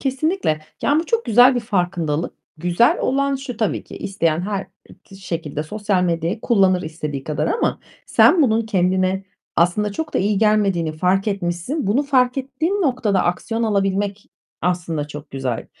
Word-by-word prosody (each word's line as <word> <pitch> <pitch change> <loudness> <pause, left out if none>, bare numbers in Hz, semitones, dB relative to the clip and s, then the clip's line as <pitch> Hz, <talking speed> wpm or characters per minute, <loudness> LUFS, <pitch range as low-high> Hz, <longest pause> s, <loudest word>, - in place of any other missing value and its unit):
Kesinlikle. 270 - 0 0.2
Ya, 285 - +3
bu 330 - -7
çok 465 0 0
güzel 245 +4 +6
bir 245 - 0
farkındalık. 175 -7 -1 0.2
Güzel 175 +8 +2
olan 275 +1 +1
şu: 260 -4 -7
Tabii 220 -2 -1
ki - - -11
isteyen 170 -5 -1
her 195 0 -3 0.4
d 195 - -12
şekilde 165 -6 -4
sosyal 205 +2 -1
medyayı 170 +4 -1
kullanır 190 -5 +3
istediği 150 -3 -5
kadar 150 -1 -1
ama 465 - 0 0.3
sen 340 -4 +5
bunun 225 -3 +2
kendine 185 -1 +1 0.3
aslında 200 +4 +2
çok 315 +6 -5
da - - +3
iyi 200 +1 +1
gelmediğini 200 -7 +2
fark 185 +5 +1
etmişsin. 195 - -2
Bunu 240 +9 +2
fark 255 -2 +2
ettiğin 315 +10 -1
noktada 245 - +1
aksiyon 225 +6 -1
alabilmek 200 -1 0 0.4
aslında 170 -4 -1
çok 150 0 -9
güzel. 130 -4 -3
195 Hz, 155 wpm, -20 LUFS, 175-245 Hz, 0.4 s, güzel